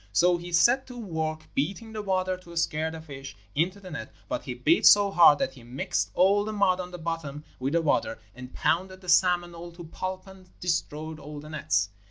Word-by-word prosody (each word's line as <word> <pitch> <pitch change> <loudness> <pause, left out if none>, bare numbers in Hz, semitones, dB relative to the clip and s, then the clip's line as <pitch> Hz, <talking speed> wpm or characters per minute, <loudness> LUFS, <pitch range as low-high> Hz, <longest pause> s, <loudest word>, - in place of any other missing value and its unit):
So 175 - +4
he 175 +1 -8
set 240 +10 +4
to 250 -1 -10
work 160 -7 -4
beating 195 +10 -2
the 215 - -4
water 185 -2 0
to 175 -2 -12
scare 160 -1 0
the 160 0 -8
fish 140 -5 -9 0.2
into 180 +6 0
the 185 -2 -11
net; 115 -7 -6 0.2
but - - -3
he 125 - -4
beat 150 +7 +4
so 205 -1 +7
hard 170 -5 +7
that 135 - -1
he 130 - -14
mixed 135 +10 -2
all 195 +3 +4
the 215 - -4
mud 200 -3 +2
on 180 -1 -5
the 180 - -8
bottom 160 -3 -5 0.2
with 135 +3 -2
the 170 0 +2
water, 285 - +1 0.2
and 125 0 -10
pounded 185 +2 -1
the 180 - -9
salmon 175 -1 +3
all 170 +1 -9
to 175 0 -10
pulp 185 +3 -5
and 190 -1 -15
destroyed 160 -2 -2
all 150 0 -8
the 150 +1 -10
nets. 100 - 0
170 Hz, 220 wpm, -27 LUFS, 150-185 Hz, 0.2 s, so